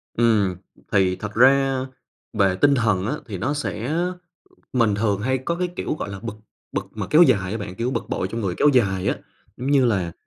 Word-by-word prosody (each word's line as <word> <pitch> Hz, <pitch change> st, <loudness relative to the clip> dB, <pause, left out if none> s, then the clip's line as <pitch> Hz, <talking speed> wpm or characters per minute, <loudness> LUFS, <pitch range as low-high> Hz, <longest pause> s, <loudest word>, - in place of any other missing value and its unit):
Ừm, 110 Hz, -6 st, +2 dB, 0.4 s
thì 95 Hz, -2 st, +3 dB
thật 105 Hz, +1 st, -7 dB
ra, 135 Hz, +2 st, +4 dB, 0.5 s
về 100 Hz, -4 st, +2 dB
tinh 140 Hz, +7 st, +4 dB
thần 105 Hz, -6 st, +1 dB
á, 120 Hz, -, -1 dB
thì 100 Hz, -4 st, -5 dB
nó 130 Hz, +10 st, -1 dB
sẽ 130 Hz, -3 st, -3 dB, 0.8 s
mình 115 Hz, -5 st, +2 dB
thường 105 Hz, -1 st, 0 dB
hay 130 Hz, +4 st, 0 dB
có 130 Hz, +7 st, -2 dB
cái 180 Hz, +1 st, -1 dB
kiểu -, -, -2 dB
gọi 150 Hz, -, -5 dB
là 100 Hz, -, -6 dB
bực, 115 Hz, -2 st, -5 dB, 0.4 s
bực -, -, -2 dB
mà -, -, -4 dB
kéo 155 Hz, +3 st, +6 dB
dài 100 Hz, -, +3 dB
á 110 Hz, -, -2 dB
bạn, 100 Hz, -3 st, -6 dB
kiểu 120 Hz, +4 st, -2 dB
bực -, -, -3 dB
bội 95 Hz, -, -2 dB
trong 115 Hz, +3 st, -4 dB
người 95 Hz, -4 st, -2 dB
kéo 150 Hz, -, +4 dB
dài 95 Hz, -7 st, +2 dB
á. -, -, 0 dB, 0.4 s
Giống 130 Hz, +3 st, -3 dB
như 140 Hz, -3 st, +4 dB
là, 95 Hz, -8 st, 0 dB
115 Hz, 215 wpm, -23 LUFS, 100-130 Hz, 0.8 s, kéo